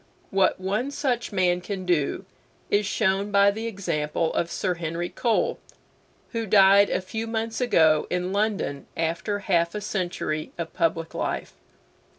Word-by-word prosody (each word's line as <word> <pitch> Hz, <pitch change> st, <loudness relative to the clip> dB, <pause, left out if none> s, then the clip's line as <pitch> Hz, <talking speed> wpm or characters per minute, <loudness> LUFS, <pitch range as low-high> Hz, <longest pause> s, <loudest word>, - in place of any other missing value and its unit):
What 195 Hz, -1 st, +2 dB
one 205 Hz, +8 st, -1 dB
such 255 Hz, -4 st, -1 dB
man 180 Hz, -2 st, +2 dB
can 185 Hz, 0 st, -5 dB
do 170 Hz, -6 st, 0 dB, 0.5 s
is 205 Hz, 0 st, +2 dB
shown 200 Hz, -1 st, +1 dB
by 200 Hz, 0 st, +5 dB
the 220 Hz, +3 st, -4 dB
example 165 Hz, -6 st, -1 dB
of 170 Hz, -, 0 dB
Sir 185 Hz, 0 st, -1 dB
Henry 170 Hz, 0 st, -3 dB
Cole, 230 Hz, -3 st, 0 dB, 0.7 s
who 230 Hz, -2 st, -3 dB
died 200 Hz, 0 st, +6 dB
a -, -, 0 dB
few 220 Hz, +4 st, -5 dB
months 225 Hz, +1 st, -2 dB
ago 160 Hz, -10 st, +4 dB
in 180 Hz, +1 st, -1 dB
London 200 Hz, -9 st, -1 dB
after 170 Hz, +5 st, -1 dB
half 175 Hz, -3 st, +1 dB
a -, -, -1 dB
century 175 Hz, -6 st, -3 dB
of 170 Hz, -1 st, -5 dB
public 165 Hz, -1 st, -1 dB
life. -, -, -3 dB
190 Hz, 150 wpm, -25 LUFS, 170-210 Hz, 0.7 s, died